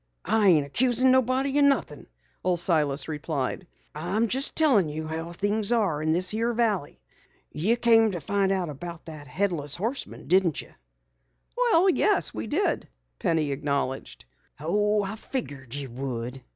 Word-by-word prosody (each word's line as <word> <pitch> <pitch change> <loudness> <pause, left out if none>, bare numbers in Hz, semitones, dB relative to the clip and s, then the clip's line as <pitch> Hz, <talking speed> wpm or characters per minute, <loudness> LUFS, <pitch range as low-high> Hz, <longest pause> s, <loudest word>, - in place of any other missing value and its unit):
"I 220 -2 +2
ain't 155 -5 +4
accusin' 250 - +2
nobody 260 +2 +2
o' - - +4
nothin'," 280 -1 +1 0.4
Old 180 -2 +1
Silas 155 -5 +1
replied. 150 +1 -3 0.3
"I'm 175 +9 -1
jes' 265 +5 +2
tellin' 250 - +3
you 155 +1 -5
how 165 +2 -5
things 205 +4 0
are 200 -11 +1
in 155 0 0
this 180 +2 0
here 230 +2 -1
valley. 210 -10 -1 0.5
Ye 195 +10 +1
came 225 -2 +4
to 175 - -3
find 195 +5 0
out 185 -4 -1
about 170 +3 -8
that 155 -3 -10
Headless 150 -2 -2
Horseman, 230 +9 -4
didn't 180 -4 +2
ye?" - - -7 0.9
"Well, 460 -8 +4
yes, 400 +2 +3
we 110 +1 -5
did," - - -1 0.3
Penny 155 -3 0
acknowledged. 135 - -3 0.9
"Figured 140 - -5
you 140 -3 -5
would. 125 0 -5
175 Hz, 145 wpm, -26 LUFS, 145-230 Hz, 0.9 s, ain't